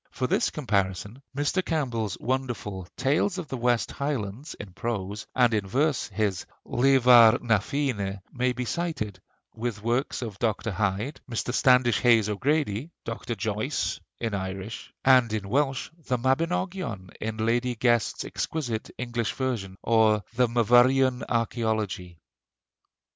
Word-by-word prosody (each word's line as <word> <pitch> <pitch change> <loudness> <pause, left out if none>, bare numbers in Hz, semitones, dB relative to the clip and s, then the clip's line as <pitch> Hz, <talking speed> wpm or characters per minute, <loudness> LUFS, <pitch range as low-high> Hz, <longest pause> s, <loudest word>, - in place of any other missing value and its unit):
For 130 - -3
this - - +2
comparison 100 - -2 0.2
Mr. 145 +6 +1
Campbell's 120 - -1
wonderful 120 -8 -3
'Tales 150 +9 +1
of 170 -6 -5
the 130 - -3
West 120 -1 +1
Highlands,' 135 -3 -4
in 100 -3 -9
prose, 105 -1 -4
and 125 -3 +4
in 105 -3 0
verse 140 +6 +1
his 100 -3 -2 0.2
'Leabhar 125 -3 +6
na 115 -3 +3
Féinne,' 105 -6 -2
may 125 0 +1
be 125 0 -3
cited, 125 - -3 0.3
with 110 -2 -4
works 120 +3 0
of 105 -4 -7
Dr. 110 -1 -1
Hyde, 105 +8 -2
Mr. 120 +1 -2
Standish 125 -4 +4
Hayes 115 -4 +4
O'Grady, 135 +3 0 0.2
Dr. 115 +1 -4
Joyce, 105 0 -2 0.2
in 115 -3 -2
Irish; 95 +2 -5
and 130 -4 +6
in 105 -3 -2
Welsh, 135 +4 0 0.2
the 125 - +1
'Mabinogion' 135 - -1
in 110 0 -3
Lady 120 +2 +1
Guest's 120 -1 +1
exquisite 120 -9 -3
English 120 -2 -2
version, 115 -8 -3
or 110 -2 +3
the 125 +1 +3
'Myvyrian 125 +3 +4
Archæology.' 110 -6 -1
120 Hz, 130 wpm, -26 LUFS, 105-130 Hz, 0.3 s, Leabhar